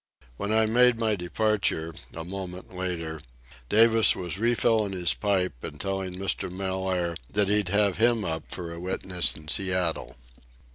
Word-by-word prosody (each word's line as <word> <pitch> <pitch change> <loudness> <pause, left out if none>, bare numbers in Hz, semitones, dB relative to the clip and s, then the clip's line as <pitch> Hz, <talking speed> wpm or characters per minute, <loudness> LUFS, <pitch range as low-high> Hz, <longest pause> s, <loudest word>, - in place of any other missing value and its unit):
When 100 - -3
I 110 0 +3
made 120 +2 +4
my 110 -2 +1
departure, 95 -3 -1 0.2
a 80 - -5
moment 90 0 -8
later, 85 -4 -4 0.5
Davis 115 0 +6
was 90 +1 -4
refilling 115 -3 +2
his 90 -2 +1
pipe 95 - -1
and 75 - -7
telling 95 -2 -3
Mr. 95 -1 -2
Mellaire 95 -2 -2
that 100 -1 +1
he'd 105 -3 +2
have 100 -1 +2
him 115 -2 +2
up 80 -2 -4
for 85 -2 -5
a 85 - -8
witness 90 0 +1
in 75 - -12
Seattle. 90 -6 0
95 Hz, 150 wpm, -26 LUFS, 90-105 Hz, 0.5 s, Davis